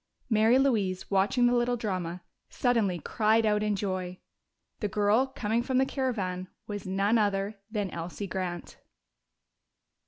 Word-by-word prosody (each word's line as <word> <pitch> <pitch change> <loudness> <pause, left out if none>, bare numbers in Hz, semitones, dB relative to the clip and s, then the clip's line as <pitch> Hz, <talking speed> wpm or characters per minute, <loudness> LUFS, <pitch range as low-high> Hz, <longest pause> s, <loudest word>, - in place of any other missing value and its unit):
Mary 220 +3 +5
Louise, 205 -10 +1
watching 200 +6 +3
the 240 - +4
little 245 0 +1
drama, 185 -5 -3 0.3
suddenly 225 -8 +1
cried 220 +6 +2
out 210 -1 +2
in 210 -1 +1
joy. 185 -2 -3 0.6
The 210 - -1
girl 210 +6 +2
coming 230 -3 -1
from 255 +1 -1
the 265 - +4
caravan 200 -10 -2 0.2
was 205 -2 -6
none 200 +4 +2
other 200 0 0
than 205 -4 -2
Elsie 170 +4 -5
Grant! 180 -2 -5
210 Hz, 135 wpm, -28 LUFS, 185-235 Hz, 0.6 s, Mary